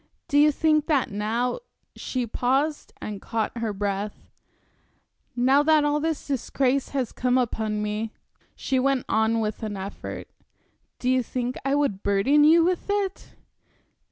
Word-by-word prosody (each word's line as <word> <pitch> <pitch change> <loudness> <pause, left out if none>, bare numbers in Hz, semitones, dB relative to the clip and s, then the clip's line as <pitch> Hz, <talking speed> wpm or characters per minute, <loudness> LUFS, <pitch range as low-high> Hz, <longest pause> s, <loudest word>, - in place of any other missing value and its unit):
Do 290 -3 +3
you 300 +1 +6
think 305 0 +2
that 290 -9 +1
now" 225 - -1 0.4
she 255 -2 -3
paused 270 +6 0
and 205 -2 -6
caught 230 +1 -2
her 225 -2 -1
breath 205 0 -4 1.0
"now 260 +3 +4
that 305 0 +4
all 295 0 +1
this 320 0 -2
disgrace 270 0 0
has 260 -5 -2
come 250 0 +1
upon 220 -4 -1
me," 210 +1 -3 0.4
she 265 -1 0
went 270 -1 +1
on 220 +1 +2
with 215 -1 -3
an 210 -2 -4
effort, 195 +1 -7 0.7
"do 250 - -4
you 255 0 +3
think 250 +1 -3
I 275 +1 +1
would 280 -10 0
burden 200 +10 +3
you 325 +2 +6
with 360 +3 -1
it?" 405 -1 -2
255 Hz, 150 wpm, -25 LUFS, 220-290 Hz, 1.0 s, you